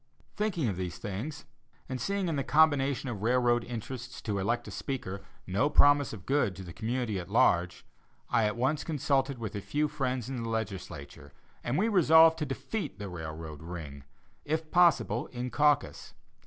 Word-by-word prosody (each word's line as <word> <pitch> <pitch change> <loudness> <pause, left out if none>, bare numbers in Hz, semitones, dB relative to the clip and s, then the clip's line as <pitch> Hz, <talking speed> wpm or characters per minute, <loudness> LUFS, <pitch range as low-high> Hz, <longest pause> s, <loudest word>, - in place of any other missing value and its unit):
Thinking 195 - 0
of 100 -5 -2
these 90 -3 -4
things, 120 +11 -5 0.4
and 130 -2 -4
seeing 200 -1 -1
in 165 - -1
the 140 - -1
combination 145 -3 +3
of 110 -6 -4
railroad 120 +1 +2
interests 125 +2 -6
to 105 -3 -1
elect 120 +5 -1
a - - -7
speaker, 100 -8 -4 0.2
no 100 +11 +1
promise 145 -3 +5
of 100 -5 -9
good 135 -9 +1
to 95 - -8
the 85 -2 -9
community 115 -3 -2
at 90 +1 -8
large, 90 -4 +2 0.4
I 115 - +2
at 105 - 0
once 135 +5 0
consulted 140 -3 0
with 110 -4 -5
a 100 - -3
few 150 +8 0
friends 130 -5 -2
in 130 -2 -4
the 115 - -4
legislature, 85 -10 -5 0.3
and 120 +4 -1
we 210 - +2
resolved 165 -5 +6
to 150 - -2
defeat 135 - -4
the 100 -2 -6
railroad 80 -3 -7
"ring," 80 -5 -8 0.4
if 155 +1 -2
possible, 165 - +3
in 125 0 -5
caucus. 150 -1 +1
125 Hz, 175 wpm, -30 LUFS, 100-145 Hz, 0.4 s, resolved